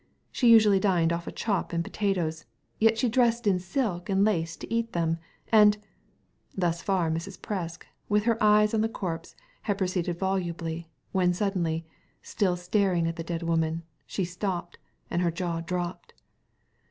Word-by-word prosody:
She 245 - +3
usually 215 -4 +7
dined 175 -4 +2
off 170 0 -4
a - - -3
chop 200 -5 -2
and 170 0 0
potatoes, 175 - -1 0.3
yet 225 0 +4
she 245 - +2
dressed 235 0 +2
in 190 -3 +3
silk 185 -1 -2
and 195 +1 +3
lace 165 -6 0
to - - -7
eat 230 0 -1
them. 165 -1 0 0.3
And 210 -1 +7 0.4
" - - -37
Thus 170 -2 0
far 185 -4 +1
Mrs. 170 +4 -4
Presk 175 -5 -4 0.3
with 210 0 +3
her 230 0 +1
eyes 210 0 +5
on 220 - +2
the 225 - +1
corpse 175 -7 -5 0.3
had 205 -3 -1
proceeded 180 -2 -1
volubly, 170 -3 -2 0.2
when 180 -2 +2
suddenly 175 -5 -1 0.2
— - - -40
still 185 -3 +2
staring 180 -1 +1
at 165 0 -1
the 165 - -5
dead 170 0 -4
woman 165 0 0
— - - -42
^she 190 - -1
stopped, 180 -1 -4 0.3
and 175 - +1
her 175 - +2
jaw 170 0 -2
dropped. 175 +1 -4
180 Hz, 175 wpm, -27 LUFS, 170-210 Hz, 0.4 s, usually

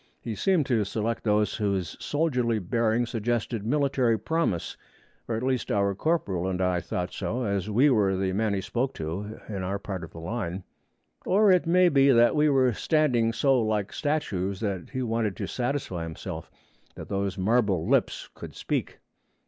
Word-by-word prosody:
He 115 - -5
seemed 170 - +2
to 115 -5 +1
select 110 +3 -2
those 105 -1 +1
whose 100 -5 -1
soldierly 125 -7 0
bearing 115 +3 +1
suggested 115 -1 -2
military 130 -2 +2
promise; 110 - -1 0.5
at 115 +1 -1
least 130 -3 -1
our 100 -1 +2
corporal 100 - -1
and 95 -1 -2
I 90 -1 +1
thought 90 +1 -4
so, 125 +3 -2
as 100 -2 -1
we 120 +7 +4
were 100 -5 +3
the 95 0 -1
men 105 +1 0
he 95 - -1
spoke 125 +6 -2
to 95 +8 -5
in 100 -3 -4
our 95 +2 -2
part 95 -3 -6
of 85 - -8
the 85 - -11
line. 90 0 -4 0.6
Or 205 +1 +4
it 180 -2 +3
may 180 +2 +5
be 140 -4 +4
that 120 0 +5
we 150 0 +4
were 130 -3 +3
standing 125 -6 +2
so 135 +1 +2
like 105 -2 -1
statues 100 - -1
that 100 -4 -3
he 130 -1 -3
wanted 115 -4 -1
to - - -3
satisfy 125 -8 -2
himself 80 0 -6 0.5
that - - -8
those 100 0 -2
marble 100 -4 +1
lips - - +1
could - - -10
speak. - - -3
110 Hz, 175 wpm, -27 LUFS, 95-130 Hz, 0.6 s, may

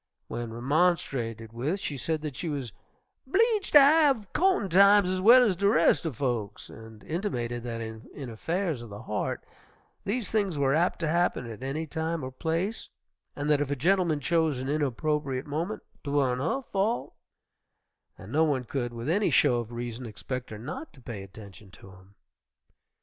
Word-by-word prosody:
When 120 -1 -5
remonstrated 120 -4 0
with 145 +12 -2
she 150 - -4
said 155 +4 -2
that 150 -4 -4
she 170 - -4
was 135 -7 -4 0.5
"'bleeged 430 - +2
ter 295 - +11
have 280 -7 +4
co'tin' 370 - +2
times 200 +1 +6
ez 185 0 -1
well 240 +5 +8
ez 210 -6 +2
de 200 +3 +2
res' 165 -1 +4
er 160 - -2
folks," 120 -6 -3
and 110 -1 -12
intimated 120 - -3
that 115 -1 -5
in 115 +5 -8
affairs 165 - -2
of 120 - -9
the 100 +3 -9
heart 105 -3 -3 0.6
these 220 +2 -2
things 200 -7 0
were 135 -1 +2
apt 170 +4 +2
to 165 - 0
happen 170 -5 +1
at 115 0 -8
any 140 +5 -3
time 160 +1 -3
or 130 - -5
place, 165 - -2 0.5
and 145 0 -3
that 145 -1 +3
if 145 - -1
a 145 - 0
gentleman 170 +1 +2
chose 160 -2 +1
an 130 +2 -4
inopportune 145 -1 -1
moment 165 +8 -3 0.2
"'twan't 140 -3 +1
her 265 - -1
fault," 215 +2 -1 1.0
and - - -11
no 155 +2 +3
one 140 -5 +1
could, 120 -1 -3
with 120 +2 -6
any 200 +6 +2
show 130 -5 +4
of 120 -1 -4
reason, 120 0 -5
expect 125 +4 -6
her 110 - -7
not 145 - -7
to 140 - -16
pay 115 -5 -7
attention 100 0 -12
to 95 +1 -15
him. 95 +1 -18
145 Hz, 175 wpm, -28 LUFS, 120-180 Hz, 1.0 s, ter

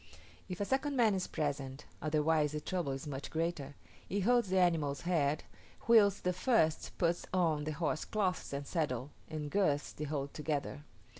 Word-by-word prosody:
If 180 - -5
a 205 - 0
second 270 +4 0
man 230 -5 +4
is 185 -1 -1
present 140 -2 -3 0.2
(otherwise 155 -1 +2
the 150 - -1
trouble 170 -2 -2
is 135 +3 -4
much 140 -1 -5
greater) 160 -4 -2 0.3
he 200 +1 0
holds 240 0 +3
the 190 - +2
animal's 160 -6 +2
head, 155 -4 +1 0.4
whilst 205 -4 +5
the 180 - +1
first 185 -5 +1
puts 170 0 0
on 160 -5 +1
the 155 - -2
horsecloths 180 +5 -1
and 140 0 -3
saddle, 145 -5 -2 0.2
and 150 -2 -4
girths 150 -8 +1
the 150 - -4
whole 140 -2 -2
together. 145 -1 -3
155 Hz, 165 wpm, -34 LUFS, 145-185 Hz, 0.4 s, whilst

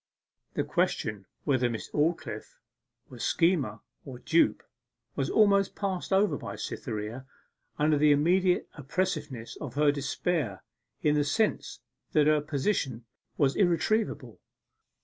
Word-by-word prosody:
The - - +1
question 105 -3 -1 0.2
whether 130 -3 +2
Miss 115 -2 -6
Aldclyffe 165 - -2 0.5
were - - -11
schemer 150 - +1 0.2
or 130 -3 -8
dupe 165 +6 +2 0.5
was - - -1
almost 200 -2 +3
passed 195 -2 -3
over 195 +2 +3
by - - -6
Cytherea, 110 +5 -5 0.5
under 150 0 +3
the 150 0 +5
immediate 180 +5 +3
oppressiveness 140 -5 -3
of 140 -5 -7
her 150 0 +4
despair 140 - -2 0.4
in 150 - +4
the 150 -1 +2
sense 210 +10 -1 0.3
that 150 -4 +4
her 155 0 +4
position 140 - -1 0.3
was 140 -3 +2
irretrievable. 175 - 0
150 Hz, 120 wpm, -28 LUFS, 130-180 Hz, 0.5 s, the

